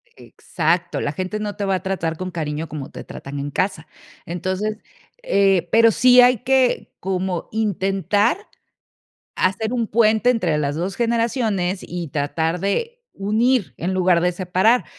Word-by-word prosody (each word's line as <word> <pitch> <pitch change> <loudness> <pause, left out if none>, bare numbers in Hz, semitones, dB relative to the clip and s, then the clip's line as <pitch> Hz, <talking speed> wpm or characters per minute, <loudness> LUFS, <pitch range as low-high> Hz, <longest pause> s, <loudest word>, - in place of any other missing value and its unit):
Exacto. 170 +1 -2
La 145 - -1
gente 185 +7 -4
no 210 -1 -4
te 205 - -3
va 195 -1 +1
a 185 - -4
tratar 170 -4 -2
con 185 +1 -5
cariño 155 -2 -3
como 150 -4 -7
te - - -8
tratan 140 +1 -8
en 145 +1 -4
casa. 185 -1 -2 0.4
Entonces, 185 +5 -3 0.5
eh, 195 - +2
pero 230 0 +6
sí 250 +3 +6
hay 250 0 +5
que 260 +1 +1
como 185 -1 -3
intentar 205 - +1 1.0
hacer 205 +5 0
un 235 -3 -1
puente 220 +2 +3
entre 180 -11 +1
las 145 -1 -1
2 180 +4 -3
generaciones, 230 -5 0
y 175 -2 -6
tratar 160 +4 -1
de 465 - -2 0.2
unir 220 +2 +1
en 175 +3 -2
lugar 180 -2 +3
de 180 +1 +2
separar. 185 +7 +2
190 Hz, 150 wpm, -21 LUFS, 175-220 Hz, 1.0 s, pero